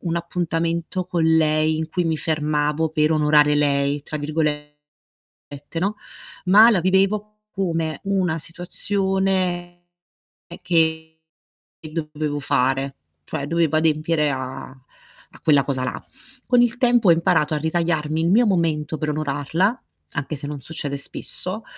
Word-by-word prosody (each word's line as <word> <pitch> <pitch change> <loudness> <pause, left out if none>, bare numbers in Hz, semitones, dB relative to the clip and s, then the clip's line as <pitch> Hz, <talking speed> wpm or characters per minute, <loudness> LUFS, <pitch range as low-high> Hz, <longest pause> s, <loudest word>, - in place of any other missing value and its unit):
un 170 -1 -2
appuntamento 170 +1 -2
con 170 -2 0
lei 155 -1 +3
in 160 0 -3
cui 180 +2 -1
mi 160 -1 0
fermavo 150 0 0
per 155 0 +2
"onorare" 150 -1 +4
lei, 140 -1 +1
tra 155 - -6
virgolette, 150 0 -2 1.1
no, 200 +4 -1 0.5
ma 210 +5 +7
la 195 -7 +2
vivevo 200 +3 +1
come 165 -5 -2
una 185 -5 0
situazione 185 +1 -1 0.8
che 160 -1 0 0.6
dovevo 155 -2 -4
fare, 135 0 0 0.3
cioè 140 - -4
dovevo 165 -1 +1
adempiere 155 -1 +1
a 130 0 -5 0.7
a - - -14
quella 145 -3 +4
cosa 130 -1 -2
là. - - -5 0.4
Con 245 -1 +4
il 240 +1 +1
tempo 240 -4 +3
ho - - +9
imparato 165 -2 +1
a - - +1
ritagliarmi 160 -1 -1
il 165 - +1
mio 235 +5 +5
momento 160 -5 0
per 155 - -3
onorarla, 155 - -1 0.3
anche 145 +1 -3
se 145 0 -7
non 145 -1 -5
succede 145 -1 -3
spesso, 185 +8 -4
160 Hz, 130 wpm, -22 LUFS, 150-175 Hz, 1.1 s, ho